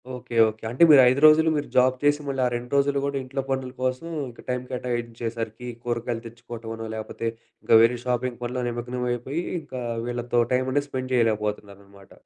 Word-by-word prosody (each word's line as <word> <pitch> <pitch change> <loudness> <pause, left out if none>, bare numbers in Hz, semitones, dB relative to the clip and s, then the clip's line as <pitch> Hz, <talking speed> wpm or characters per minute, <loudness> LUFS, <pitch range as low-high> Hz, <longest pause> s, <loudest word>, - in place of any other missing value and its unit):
Okay. 125 -1 -8
Okay. 110 +1 -11
అంటే 125 +8 +3
మీరు 145 -3 +9
5 130 +2 +1
రోజులు 155 +1 +7
మీరు 145 - -3
జాబ్ 130 0 +5
చేసి 145 +1 +3
మళ్ళీ 135 -1 -1
ఆ - - +3
2 120 +1 -6
రోజులు 140 0 +2
కూడా 140 0 -2
ఇంట్లో 135 +1 -3
పనుల 130 -1 -2
కోసం 130 +5 -1 0.2
ఇంకా 120 - -14
టైం 125 0 -1
కేటాయించే 120 -2 -3
సరికి 115 +2 -5 0.2
కూరగాయలు 120 -1 -3
తెచ్చుకోవటమనో 115 -1 -8
లేకపోతే 110 +1 -5 0.4
ఇంకా - - +5
వేరే 115 +2 +4
షాపింగ్ 125 0 -1
పనులు 125 +1 -3
నిమగ్నమయిపోయి 125 +5 -3 0.2
ఇంకా 130 -4 -7 0.3
వీళ్ళతో 120 0 -1
టైమనేది 130 +3 +1
స్పెండ్ 130 -1 -4
చేయలేకపోతున్నారనమాట. 105 -3 -2
125 Hz, 165 wpm, -25 LUFS, 115-130 Hz, 0.4 s, మీరు